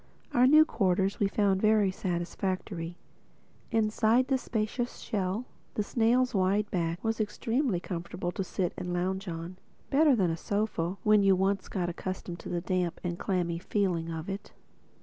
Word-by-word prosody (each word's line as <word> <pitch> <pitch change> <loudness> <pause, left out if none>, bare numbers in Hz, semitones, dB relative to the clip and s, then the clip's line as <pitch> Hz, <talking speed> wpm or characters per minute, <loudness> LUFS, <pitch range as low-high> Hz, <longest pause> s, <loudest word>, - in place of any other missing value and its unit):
Our 250 +1 +5
new 310 +3 +8
quarters 195 - +1
we 200 - +3
found 195 -1 +1
very 215 -2 +4
satisfactory. 180 -1 -3 0.7
Inside 225 +3 +2
the 265 -1 +2
spacious 240 +1 -2
shell, 200 +3 -2 0.3
the 210 - +1
snail's 245 +4 +2
wide 195 +2 +1
back 170 0 -1
was 225 0 0
extremely 225 - 0
comfortable 175 0 -4
to 195 - -3
sit 180 -1 -2
and 180 -1 -4
lounge 190 +3 -1
on—better 185 - 0
than 185 -6 +2
a 165 - -2
sofa, 200 -2 -1
when 210 -1 +5
you 195 -1 +5
once 195 +1 0
got 180 -3 -1
accustomed 175 0 -5
to - - -8
the 175 - -1
damp 180 -1 -1
and 175 -1 -3
clammy 175 -3 -1
feeling 180 -3 0
of 160 0 -5
it. 195 +1 -6
195 Hz, 155 wpm, -29 LUFS, 175-215 Hz, 0.7 s, new